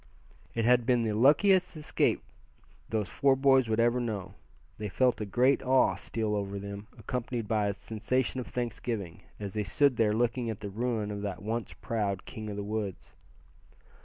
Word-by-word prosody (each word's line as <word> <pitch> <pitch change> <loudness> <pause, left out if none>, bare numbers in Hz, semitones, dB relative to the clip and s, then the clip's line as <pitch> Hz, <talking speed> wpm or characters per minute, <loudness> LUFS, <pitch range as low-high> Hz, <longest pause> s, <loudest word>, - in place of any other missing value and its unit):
It 115 -1 +1
had 125 0 +5
been 125 -2 +3
the 110 - 0
luckiest 170 - +4
escape 150 - 0 0.7
those 110 -3 -1
four 140 +5 +3
boys 135 -3 +4
would 110 +1 +1
ever 120 +1 +3
know. 110 -6 -3 0.5
They 105 -1 -3
felt 125 +3 +2
a 105 - -3
great 125 +7 +3
awe 130 -6 +4
steal 105 +3 -2
over 100 -1 -2
them, 100 +1 -7
accompanied 120 -1 -3
by 105 -1 +1
a 100 - 0
sensation 115 +5 -1
of 125 - -5
thanksgiving, 115 -7 -4 0.2
as 100 -2 -5
they 105 - -1
stood 130 +5 +2
there 105 -2 +3
looking 120 +1 0
at 110 - -5
the 100 - -5
ruin 110 -1 -1
of 100 0 -4
that 100 -2 -4
once 115 +2 -3
proud 100 -4 -2
king 110 -4 -7
of 105 - -4
the 100 - -3
woods. 105 -2 -4
110 Hz, 180 wpm, -30 LUFS, 105-125 Hz, 0.7 s, had